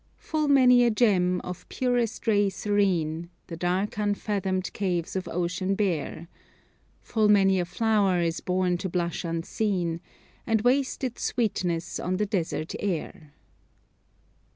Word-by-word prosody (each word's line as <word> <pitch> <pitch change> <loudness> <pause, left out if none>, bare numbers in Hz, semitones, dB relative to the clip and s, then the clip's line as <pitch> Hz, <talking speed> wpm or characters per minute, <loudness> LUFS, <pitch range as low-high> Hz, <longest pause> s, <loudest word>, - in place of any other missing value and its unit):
"Full 310 -2 -2
many 250 -3 +6
a 240 - +4
gem, 185 -6 +2
of 180 0 -8
purest 245 -3 -1
ray 205 -3 +3
serene, 175 -6 0 0.2
The 170 - -7
dark 185 +5 -1
unfathomed 200 -2 -1
caves 180 -4 -2
of 185 -2 -3
ocean 180 +3 -1
bear; 170 -4 -2 0.8
Full 215 -2 +1
many 195 -2 +5
a 175 - 0
flower 200 -1 +1
is 165 -1 0
born 180 -1 0
to 190 - -3
blush 170 -1 -2
unseen, 170 +1 -1 0.5
And 225 -2 +2
waste 265 +2 +1
its 250 -2 -3
sweetness 180 -8 -1
on 185 +1 -1
the 210 - +1
desert 175 -5 -2
air." 160 -5 -4
190 Hz, 130 wpm, -26 LUFS, 175-215 Hz, 0.8 s, many